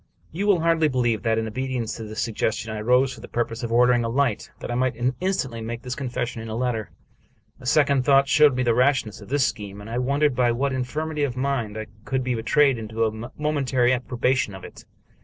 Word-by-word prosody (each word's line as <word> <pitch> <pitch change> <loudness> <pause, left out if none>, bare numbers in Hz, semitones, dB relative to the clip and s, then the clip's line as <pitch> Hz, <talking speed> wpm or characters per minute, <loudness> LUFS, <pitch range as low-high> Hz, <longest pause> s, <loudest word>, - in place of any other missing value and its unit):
You 195 +6 -2
will 190 -5 +4
hardly 165 -1 +3
believe 120 -5 0
that, 115 -1 +1
in 110 - 0
obedience 130 0 -3
to 115 - -6
this 110 +1 -5
sug 115 - -2
gestion, 110 +1 -1
I 105 - -4
rose 125 +3 +3
for - - -12
the - - -9
purpose 115 0 -2
of 120 -2 -4
ordering 120 0 +4
a 115 - -1
light, 125 -3 0
that - - -5
I - - -1
might 125 0 0 0.2
instantly 135 -12 -2
make 115 +1 -5
this 125 - -4
confession 125 -3 -4
in 115 - -7
a 110 - -4
letter. 115 -3 -2 0.7
A 125 - -9
second 140 -2 +3
thought 140 +1 +4
showed 150 -2 +5
me 130 - 0
the 120 -2 +3
rashness 125 -4 +1
of 100 - -12
this 140 -1 +2
scheme, 100 -1 -4
and 105 - -10
I 115 +2 -2
won 140 +3 0
dered 150 -3 +4
by 120 -1 +2
what 135 +3 -1
infirmity 150 +4 -3
of 130 -3 -2
mind 130 -6 -1
I 110 - -4 0.2
could 130 +1 -1
be 125 0 -1
betrayed 130 +3 +2
into 110 +1 -1
a 110 +3 -4
momentary 135 -5 +1
approbation 125 -2 0
of 95 - -11
it. - - -12
125 Hz, 230 wpm, -24 LUFS, 115-135 Hz, 0.7 s, showed